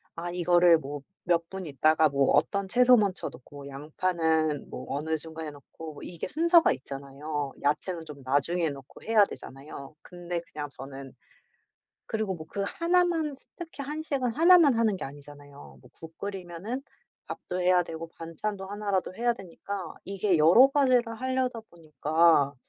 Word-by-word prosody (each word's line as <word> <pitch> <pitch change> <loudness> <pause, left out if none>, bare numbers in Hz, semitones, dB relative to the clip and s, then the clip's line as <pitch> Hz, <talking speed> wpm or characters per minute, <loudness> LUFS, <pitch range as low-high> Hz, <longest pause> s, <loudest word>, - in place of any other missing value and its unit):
아 170 +1 -4
이거를 175 -1 +5
뭐 145 -1 -7 0.2
몇 170 -1 +1
분 190 -2 -6
있다가 155 +2 +3
뭐 140 -1 +2
어떤 200 -1 +2
채소 250 +4 +6
먼저 200 -4 0
넣고 140 +2 -12
양파는 155 +1 -1
뭐 - - -7
어느 155 +3 -1
중간에 160 0 -7
넣고 145 +2 -11
이게 170 -2 -6
순서가 335 +2 +4
있잖아요. 140 +1 -5
야채는 160 +5 -1
좀 140 -3 -10
나중에 155 +6 +1
넣고 135 -2 -12
해야 220 -2 +5
되잖아요. 140 -2 -10
근데 175 -1 -5
그냥 150 -1 -5
저는 135 0 -9 0.9
그리고 215 -3 -2
뭐 155 -2 -9
그 200 +3 -3
하나만 335 - +1 0.2
특히 325 -5 -7
한식은 285 -3 -2
하나만 330 -1 +6
하는 225 -3 +2
게 - - -6
아니잖아요. 145 0 -12
뭐 - - -18
국 165 0 -13
끓이면은 195 +5 -5 0.4
밥도 180 - -5
해야 180 0 +4
되고 165 -1 -7
반찬도 170 +5 -5
하나라도 200 -2 -2
해야 240 +3 +1
되니까 195 -2 -7
이게 195 -2 +1
여러 175 - +7
가지를 255 -5 +2
하려다 260 -2 -1
보니까. 160 -2 +2
175 Hz, 320 characters per minute, -28 LUFS, 150-215 Hz, 0.9 s, 여러